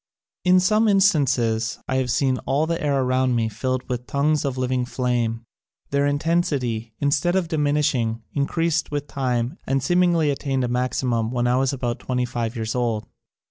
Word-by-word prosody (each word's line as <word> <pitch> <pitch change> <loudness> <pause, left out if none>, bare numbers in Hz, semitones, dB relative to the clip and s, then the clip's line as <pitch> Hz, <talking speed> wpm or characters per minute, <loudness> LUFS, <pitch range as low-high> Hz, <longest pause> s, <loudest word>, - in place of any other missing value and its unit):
In 185 0 +5
some 215 +5 +3
instances 135 - +2
I 130 - 0
have 130 -1 0
seen 130 +1 +1
all 140 +4 +2
the 165 +1 -2
air 140 -3 +1
around 130 0 +1
me 115 -1 +1
filled 130 +3 -3
with 125 0 -4
tongues 150 +1 +1
of 135 -2 -2
living 130 0 0
flame. 120 -2 -1 0.5
Their 140 0 +2
intensity, 145 -7 -1
instead 145 +5 +1
of 185 -3 +1
diminishing, 145 -7 0
increased 165 +3 0
with 145 -1 -3
time 125 +1 -2
and 135 0 0
seem 175 +5 +3
ingly 170 -4 +3
attained 135 -2 -1
a - - 0
maximum 125 -2 0
when 120 0 -1
I 125 +1 +2
was 135 0 +2
about 125 -3 -3
twenty 125 -1 -1
five 120 -1 -3
years 110 -1 -3
old. 115 -4 -1
130 Hz, 175 wpm, -23 LUFS, 120-150 Hz, 0.5 s, In